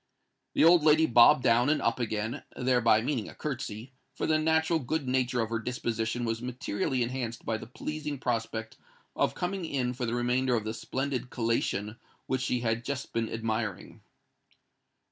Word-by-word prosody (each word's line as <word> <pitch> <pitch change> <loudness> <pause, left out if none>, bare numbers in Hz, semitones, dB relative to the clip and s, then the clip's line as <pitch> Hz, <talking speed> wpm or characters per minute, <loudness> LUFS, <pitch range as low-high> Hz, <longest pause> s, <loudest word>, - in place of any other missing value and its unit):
The - - +4
old 170 +1 +7
lady 155 +1 +6
bobbed 125 +2 +6
down 120 +3 +4
and 155 - +3
up 115 +2 0
again—thereby 115 +1 +1
meaning 125 -5 -2
a - - -12
curtsey; 130 -4 -5 0.2
for - - -2
the 155 0 +2
natural 160 +1 +2
good 145 +1 -2
nature 125 -1 +1
of 110 0 -3
her 115 - 0
disposition 120 0 -2
was 115 0 -2
materially 125 0 -1
enhanced 120 -1 -4
by 110 - 0
the - - -9
pleasing 150 +3 -5
prospect 115 -2 -3 0.4
of - - +1
coming 180 +1 -2
in 130 -6 -1
for 125 -1 -3
the 115 - -1
remainder 125 +1 +1
of 110 - -1
the 110 +1 -3
splendid 130 +1 -3
collation 115 -3 -1 0.3
which 130 -1 -1
she 125 -1 0
had 115 0 0
just 140 +1 -4
been 115 -1 -1
admiring. 110 -3 -3
125 Hz, 165 wpm, -29 LUFS, 115-135 Hz, 0.4 s, old